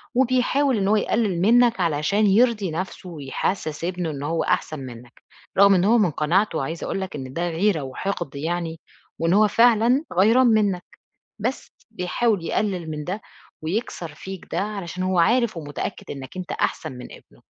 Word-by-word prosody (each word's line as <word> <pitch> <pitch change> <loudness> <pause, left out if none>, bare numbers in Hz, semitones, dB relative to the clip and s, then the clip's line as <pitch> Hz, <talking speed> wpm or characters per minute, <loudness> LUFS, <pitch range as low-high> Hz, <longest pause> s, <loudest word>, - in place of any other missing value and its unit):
وبيحاول 255 +1 +2
إنه 195 +1 +1
هو - - +5
يقلّل 205 -4 0
منك 235 +1 +4
علشان 170 +6 +2
يرضي 210 -3 +3
نفْسه 185 +2 -5
ويحسّس 155 +1 -3
ابنه 180 -2 -2
إن 140 -1 -6
هو 165 +2 0
أحسن 155 -2 -1
منك، 125 -1 -11 0.3
رغم 200 0 +7
إن 180 +1 +2
هو 235 +3 +5
من 195 -7 +3
قناعته 165 +2 +1
عايزة 165 +4 -4
أقول 195 - -2
لك 190 - -5
إن 130 -2 -7
ده 175 +2 -1
غيرة 170 -1 +1
وحقد 145 +2 -4
يعني، 165 +2 -3 0.4
وإن 165 +2 +2
هو 210 +1 +5
فعلًا 235 +5 +4
غَيران 225 +8 +5
منك، 205 -5 +2 0.6
بس 245 +6 -3 0.2
بيحاول 195 -1 0
يقلّل 185 -6 -1
من 150 -1 -4
ده 195 +5 -4 0.4
ويكسر 170 -3 -4
فيك 190 +3 -8
ده 170 - 0
علشان 190 -4 -4
هو 185 -1 +1
عارف 230 +1 +3
ومتأكد 145 -2 -5
إنك 135 +4 -8
أنت 180 - -5
أحسن - - -2
من 125 -1 -9
ابنه، - - -16
185 Hz, 170 wpm, -23 LUFS, 160-215 Hz, 0.6 s, رغم